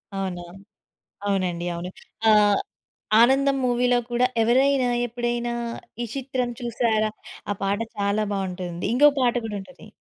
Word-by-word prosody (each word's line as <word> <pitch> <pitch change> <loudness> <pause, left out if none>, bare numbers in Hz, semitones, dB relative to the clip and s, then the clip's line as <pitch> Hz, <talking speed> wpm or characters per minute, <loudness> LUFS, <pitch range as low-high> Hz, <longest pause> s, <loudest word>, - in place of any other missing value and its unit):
అవునా? 185 -2 -3 0.8
అవునండి. 185 -4 -1
అవును. 170 +1 -5 0.4
ఆహ్, 210 -1 +5 0.6
ఆనందం 270 +3 +4
మూవీలో 245 0 +2
కూడా, 240 +1 +3 0.2
ఎవరైనా 260 +2 +3 0.2
ఎప్పుడైనా 240 0 -2 0.5
ఈ - - -2
చిత్రం 255 -2 -2
చూసారా 230 -2 0 0.4
ఆ - - -3
పాట 195 +1 0 0.2
చాలా 200 +1 +1
బావుంటుంది. 180 -3 -4
ఇంగో 290 +4 +7
పాట 245 -2 +3
కూడా 210 -2 -4
ఉంటది. 195 +8 -14
230 Hz, 120 wpm, -24 LUFS, 195-245 Hz, 0.8 s, ఇంగో